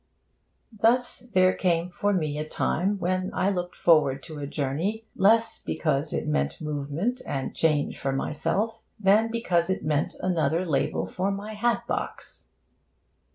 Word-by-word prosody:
Thus 240 +4 +2
there 185 -6 +3
came 175 -1 0
for 205 +3 0
me 155 -6 -1
a 155 0 -4
time 195 +4 0
when 185 0 -1
I 195 +2 +2
looked 180 -2 -3
forward 145 -5 +3
to 155 -3 -8
a 140 - -4
journey 155 +11 -2
less 225 +3 +3
because 150 -1 -1
it - - -2
meant 70 -2 0
movement 150 - -2
and 135 -2 -4
change 155 -3 +1
for 135 - -1
myself 160 +11 -1 0.2
than 215 +3 +4
because 185 -7 0
it 190 - -1
meant 150 -1 0
another 170 -1 +1
label 150 -6 0
for 185 +2 -2
my 200 +2 -4
hat 235 +3 0
box. - - -5
175 Hz, 150 wpm, -26 LUFS, 150-205 Hz, 0.2 s, than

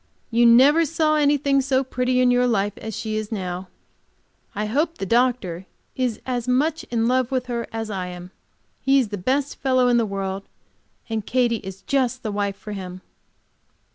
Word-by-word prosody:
You 235 +1 +5
never 275 +8 +6
saw 310 0 +1
anything 285 -2 +3
so 265 0 +1
pretty 250 -1 0
in 250 -1 +4
your 245 0 +3
life, 205 -3 0
as 220 -2 -6
she 215 -1 -3
is 215 0 -4
now. 185 -3 -4 0.9
I 210 +1 -1
hope 300 +9 0
the 195 - -3
doctor 220 -6 +1 0.3
is 250 -4 -1
as 245 -2 -2
much 295 +6 +1
in 230 -1 0
love 255 0 +2
with 260 -2 -1
her 235 -2 -3
as 225 -1 -4
I 185 -2 -3
am. 180 0 -9 0.5
He 270 0 +3
is 250 -6 +2
the 205 - -4
best 270 +8 -1
fellow 255 -2 +2
in 240 - +4
the 230 -2 +1
world, 195 0 -3 0.7
and 225 -2 -2
Katy 240 0 +1
is 195 -2 -9
just 255 0 0
the 215 - -2
wife 200 -1 -1
for 210 - -9
him. 185 -2 -7
240 Hz, 185 wpm, -23 LUFS, 205-260 Hz, 0.9 s, never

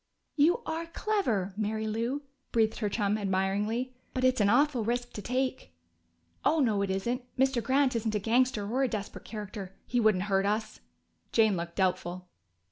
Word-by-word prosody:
"You 340 +10 +3
are 325 +1 -3
clever, 290 - 0
Mary 215 +1 -1
Lou!" 230 +6 -2 0.3
breathed 220 -1 +2
her 210 -3 0
chum 205 0 0
admiringly. 205 +6 0 0.2
"But 255 - -1
it's 255 -3 +3
an 200 - +4
awful 255 0 +3
risk 240 +2 -2
to 210 - -5
take." 250 - -2 0.7
"Oh 320 - +3
no, 220 -7 +2
it 200 - 0
isn't. 235 +7 -1 0.2
Mr. 265 -1 +2
Grant 265 +1 +2
isn't 220 -1 -1
a - - +2
gangster 230 0 +2
or 250 +5 0
a 265 - +3
desperate 210 -4 -5
character. 205 -3 -7
He 245 - 0
wouldn't 215 -5 +3
hurt 195 -1 +1
us." 215 +1 -2 0.5
Jane 220 -3 +4
looked 170 0 -5
doubtful. 180 -1 -1
220 Hz, 170 wpm, -29 LUFS, 200-255 Hz, 0.7 s, an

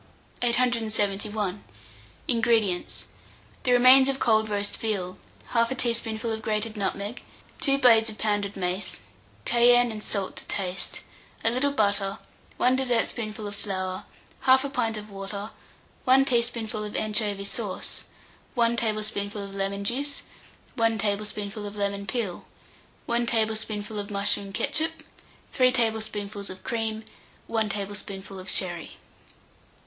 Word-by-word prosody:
871. 215 -4 +1 0.6
INGREDIENTS. 225 -6 +1 0.6
The 250 - +1
remains 255 +2 +8
of 270 - 0
cold 220 -3 +3
roast 205 -1 -1
veal, 190 -4 -2 0.3
1/2 235 +2 +2
teaspoonful 230 -1 0
of 220 0 -3
grated 215 0 -1
nutmeg, 200 +3 -2 0.4
2 275 -1 +3
blades 230 -4 +6
of 215 - -8
pounded 205 -2 0
mace, 185 +1 -2 0.4
cayenne 245 0 +5
and 215 -1 -6
salt 200 -2 -2
to - - -6
taste, 180 -2 -2 0.4
a 225 - +4
little 265 +4 +2
butter, 200 -5 +1 0.4
1 255 +1 +4
dessertspoonful 230 -4 0
of 205 - -5
flour, 185 -2 -3 0.4
1/4 265 +1 +5
pint 225 -5 0
of 210 0 -8
water, 200 +2 -5 0.5
1 265 +1 +6
teaspoonful 235 -4 0
of 210 - -6
anchovy 210 -2 0
sauce, 200 -1 -4 0.5
1 235 -1 +3
tablespoonful 215 -2 -2
of 200 0 -8
lemon 195 0 -2
juice, 280 +7 -2 0.5
1 225 -2 +2
teaspoonful 205 0 -2
of 205 - -8
lemon 200 -1 -2
peel, 210 -6 -2 0.6
1 235 0 +1
tablespoonful 220 -2 -1
of 200 +1 -5
mushroom 200 0 0
ketchup, 315 - -1 0.5
3 255 -1 +5
tablespoonfuls 215 -4 -1
of 185 0 -9
cream, 225 -1 -2 0.4
1 220 -2 0
tablespoonful 200 -1 -5
of 185 - -8
sherry. 175 -3 -2
215 Hz, 125 wpm, -27 LUFS, 200-235 Hz, 0.6 s, remains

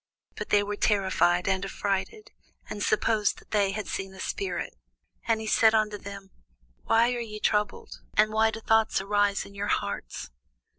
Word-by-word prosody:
But - - -6
they 205 0 +4
were 205 0 -3
terrified 190 -4 +2
and 190 -1 +1
affrighted, 200 - -3 0.4
and 205 - -6
supposed 215 0 +1
that - - -18
they 205 -2 +2
had 205 +2 -3
seen 190 0 -4
a - - -13
spirit. 185 - -3 0.5
And 225 -1 +2
he 220 - -5
said 220 +1 +4
unto 210 -1 +1
them, 200 -1 -9 0.5
Why 235 +2 +3
are 245 - -3
ye 215 -2 -6
troubled? 210 -1 -1 0.2
and 215 +1 +4
why 220 0 +4
do 220 0 -6
thoughts 220 0 +3
arise 200 0 +1
in 200 - -13
your 200 +1 -3
hearts? 100 - -3
205 Hz, 175 wpm, -27 LUFS, 195-220 Hz, 0.5 s, they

